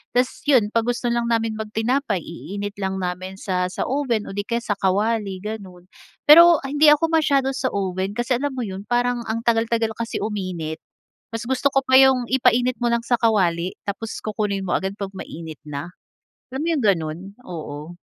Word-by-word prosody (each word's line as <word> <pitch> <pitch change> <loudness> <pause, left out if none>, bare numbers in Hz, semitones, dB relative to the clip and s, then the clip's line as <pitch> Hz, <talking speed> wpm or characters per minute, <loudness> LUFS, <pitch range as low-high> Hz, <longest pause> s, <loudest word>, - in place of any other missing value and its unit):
Ta's 250 +1 +1
yun, 250 -8 +4
'pag 230 0 +1
gusto 245 0 0
lang 235 0 0
naming 225 -1 0
mag 220 - -4
tinapay, 225 -2 0
iinit 200 +4 -6
lang 190 0 -1
namin 185 +1 -4
sa 185 -3 -1
sa - - -2
oven 260 -5 0
o - - -7
'di 205 - -1
kaya 235 0 -1
sa 205 - -1
kawali 200 0 0
ganon 190 -5 -7 0.4
Pero, 335 +1 +9
hindi 295 +3 +3
ako 300 +2 +4
masyado 280 -4 +2
sa 260 - -1
oven 190 0 -2
kasi 240 +1 +1
alam 285 +1 -1
mo 250 - -2
yun, 195 -2 -6
parang 245 0 +1
ang 225 +1 -1
tagal-tagal 230 -1 +1
kasi 230 0 -3
uminit. 185 -7 -4 0.5
Mas 225 0 -4
gusto 265 +2 +1
ko 270 0 +2
pa 260 - +4
yung 265 -2 +5
ipainit 250 -1 +3
mo 240 - +1
lang 235 0 0
sa 245 - +3
kawali 185 -6 +1
tapos 220 +3 -4
kukunin 205 -2 -2
mo 175 - 0
agad 190 +1 -4
'pag 200 -1 -4
mainit 165 -5 -8
na. 150 +4 -6 0.6
Alam 265 - -3
mo - - 0
yung 270 - -2
ganun? 165 -5 +1 0.3
Oo. 155 -1 -7
220 Hz, 190 wpm, -22 LUFS, 190-245 Hz, 0.6 s, Pero